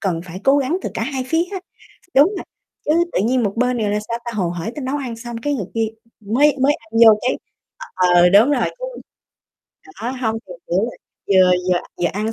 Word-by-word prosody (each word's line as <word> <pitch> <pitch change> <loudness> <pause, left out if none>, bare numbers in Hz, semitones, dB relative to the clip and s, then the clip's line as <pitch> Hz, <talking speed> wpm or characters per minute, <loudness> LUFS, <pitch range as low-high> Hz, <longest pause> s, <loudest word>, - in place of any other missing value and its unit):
cần 180 -5 -1
phải 185 +1 -8
cố 275 +1 +5
gắng 290 +7 0
từ - - -3
cả - - -2
hai 265 -3 -3
phía 325 +1 +2
á, 380 - -4 0.5
đúng 285 +6 +7
rồi, - - -5 0.4
chứ - - -1 0.2
tự - - +1
nhiên 250 +1 +2
một 200 -2 0
bên 250 +1 +1
này 210 -3 0
là, 210 - 0
sao 235 - -2
ta, 235 - -4
hồ 185 -5 0
hởi 175 +6 -4
tới 295 - -4
nấu 270 +3 -1
ăn 250 -5 -5
xong 235 0 -7
cái 290 0 0
người 205 -8 -3
kia 225 -1 +1 0.3
mới 265 +8 +2
mới 290 +2 +4
ăn 225 -1 -14
vô 220 -1 +7
cái 255 - 0 0.6
ờ, 180 -1 +5
đúng 215 +8 +6
rồi 290 - +2
chứ - - -6 1.2
đó, 240 - -1
hông 235 -4 -2
thì 185 - -9 0.2
kiểu 175 - +1
là - - -13 0.3
vừa 185 -2 +5 0.2
vừa 175 - +2 0.2
vừa - - +4
ăn 215 +3 -2
230 Hz, 230 wpm, -20 LUFS, 195-270 Hz, 1.2 s, đúng